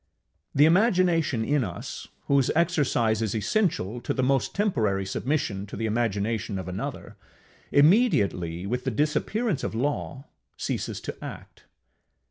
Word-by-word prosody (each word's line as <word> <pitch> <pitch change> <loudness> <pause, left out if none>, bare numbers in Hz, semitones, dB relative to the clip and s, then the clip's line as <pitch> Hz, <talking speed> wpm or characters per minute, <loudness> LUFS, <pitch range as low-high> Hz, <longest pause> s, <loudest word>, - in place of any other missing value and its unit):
The 145 - +6
imagination 170 - +3
in 145 0 +2
us, 90 -5 -6 0.2
whose 140 -2 +3
exercise 145 - +2
is 110 -1 -1
essential 120 - 0
to - - -2
the 130 - 0
most 135 -4 +1
temporary 110 - +1
submission 100 -2 -2
to - - -8
the 115 - -2
imagination 110 -2 -1
of 95 - -5
another, 90 +1 -6 0.5
immediately, 105 - +3
with 125 +5 -2
the 135 - 0
disappearance, 155 - 0
of - - -3
Law, 140 +2 -2 0.3
ceases - - -3
to - - -5
act. - - -10
125 Hz, 130 wpm, -26 LUFS, 105-155 Hz, 0.5 s, The